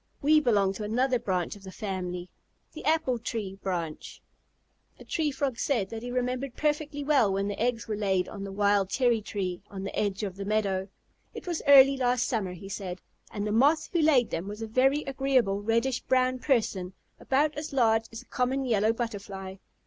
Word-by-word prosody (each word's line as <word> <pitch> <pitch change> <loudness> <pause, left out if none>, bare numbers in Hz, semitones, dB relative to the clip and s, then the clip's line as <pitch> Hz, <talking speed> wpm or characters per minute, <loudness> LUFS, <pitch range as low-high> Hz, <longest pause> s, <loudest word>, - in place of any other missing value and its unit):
We 305 +2 +5
belong 205 -8 +2
to 210 - -6
another 250 +4 +1
branch 185 -6 -2
of 205 - -14
the 190 -1 -9
family, 180 -3 -4 0.5
the 315 - -9
Apple 300 -6 +1
Tree 205 -4 -4
branch." 170 -5 -4 0.8
The - - -12
Tree 315 -2 0
Frog 270 -3 -2
said 225 -9 0
that 225 -1 -5
he 245 - -6
remembered 250 +1 -2
perfectly 295 -1 -1
well 275 -8 +3
when 195 +1 0
the 205 - -4
eggs 235 -1 0
were 215 - -2
laid 195 -3 0
on 200 -2 -7
the 195 - -6
wild 200 -1 +2
cherry 240 -3 +2
tree 185 -4 -4
on 195 -1 -7
the 195 - -5
edge 200 -1 -1
of 195 -2 -4
the 200 - -4
meadow. 195 -2 0 0.5
"It - - -7
was 345 -3 -2
early 275 -1 +8
last 250 -1 +1
summer," 200 -6 -1
he 180 +2 -10
said, 185 -2 -5 0.3
"and 205 -1 -4
the 210 - -1
Moth 280 +8 +3
who 340 - +3
laid 285 -6 +4
them 170 +4 -3
was 210 +2 -6
a - - -4
very 270 +6 +2
agreeable 260 -7 +1
reddish 230 +4 +1
brown 255 0 +1
person, 210 -9 0 0.3
about 290 +3 +1
as 295 +1 -5
large 225 -4 +3
as 225 +2 -8
a - - -30
common 265 +1 -1
Yellow 220 -2 +2
Butterfly. 200 -5 -5
225 Hz, 195 wpm, -28 LUFS, 195-265 Hz, 0.8 s, early